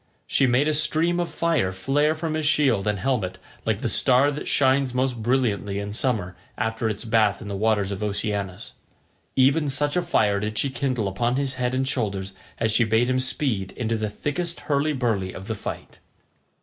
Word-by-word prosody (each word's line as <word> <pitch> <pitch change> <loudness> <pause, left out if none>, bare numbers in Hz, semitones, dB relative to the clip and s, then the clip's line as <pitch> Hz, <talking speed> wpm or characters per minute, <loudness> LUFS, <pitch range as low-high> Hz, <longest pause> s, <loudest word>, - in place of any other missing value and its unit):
She 135 - +2
made 130 +4 +3
a 155 - +2
stream 165 +3 +2
of 175 - -1
fire 160 - +1
flare 145 +11 +1
from 160 0 -3
his 155 -1 0
shield 130 -10 +2
and 105 -1 +1
helmet 110 -6 -1 0.3
like - - 0
the - - 0
star 130 +3 +4
that 145 - -6
shines 135 -1 +2
most 125 -2 0
brilliantly 110 -5 0
in 100 0 -4
summer 105 -7 -1 0.2
after 110 0 -1
its 110 +2 -4
bath 110 -3 +2
in 110 - -8
the 100 - -4
waters 105 -1 +1
of 100 - -4
Oceanus—even 105 - -2
such 145 +2 0
a 180 - +3
fire 105 -12 +2
did 105 +1 -3
she 140 - 0
kindle 130 -6 -1
upon 120 +6 0
his 135 -1 0
head 125 +1 0
and 130 0 0
shoulders 100 -7 -2 0.2
as 115 -1 0
she 115 - +4
bade 115 +3 +2
him 130 - +1
speed 130 -7 -1
into 115 -1 -2
the 110 -1 -2
thickest 165 +10 -3
hurly 150 +1 0
burly 110 -8 -1
of 95 - -8
the 110 - -3
fight. 105 - -7
120 Hz, 190 wpm, -24 LUFS, 105-140 Hz, 0.3 s, star